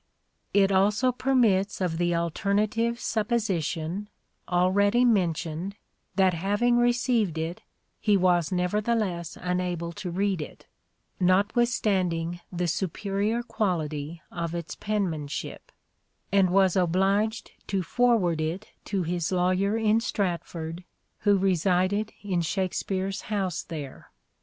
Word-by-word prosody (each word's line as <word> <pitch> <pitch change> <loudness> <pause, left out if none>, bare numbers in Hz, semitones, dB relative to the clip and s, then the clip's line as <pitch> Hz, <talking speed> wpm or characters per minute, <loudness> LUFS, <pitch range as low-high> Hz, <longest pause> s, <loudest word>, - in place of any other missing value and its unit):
It 200 -1 +4
also 210 +6 +3
permits 230 -7 +2
of 175 -3 -1
the 175 -1 +1
alternative 205 +7 0
supposition, 205 -5 -1 0.4
already 200 +6 +3
mentioned, 180 -3 0 0.4
that 190 -1 +4
having 205 +8 +1
received 240 - +2
it 165 +2 -3 0.4
he 210 -2 +3
was 175 -3 +2
nevertheless 185 -1 -1
unable 180 -2 -2
to 180 +2 -6
read 190 0 0
it 150 - -9 0.6
(notwith 200 +6 +3
standing 175 -7 0
the 180 -1 -1
superior 200 +6 -1
quality 165 - -2
of 170 -1 -3
its 165 -4 -5
penmanship) 175 -9 -3 0.6
and 195 -2 +4
was 190 -1 +3
obliged 195 +5 +1 0.2
to 195 -2 0
forward 195 -6 +2
it 170 +7 -3 0.2
to 195 -3 -1
his 170 0 -2
lawyer 185 +3 +2
in 220 0 +3
Stratford, 175 -5 -3 0.4
who 205 -1 +3
resided 190 +3 +1
in 185 -4 0
Shakspere's 190 +2 -2
house 195 -5 -1
there. 150 -5 -8
190 Hz, 110 wpm, -27 LUFS, 170-210 Hz, 0.6 s, It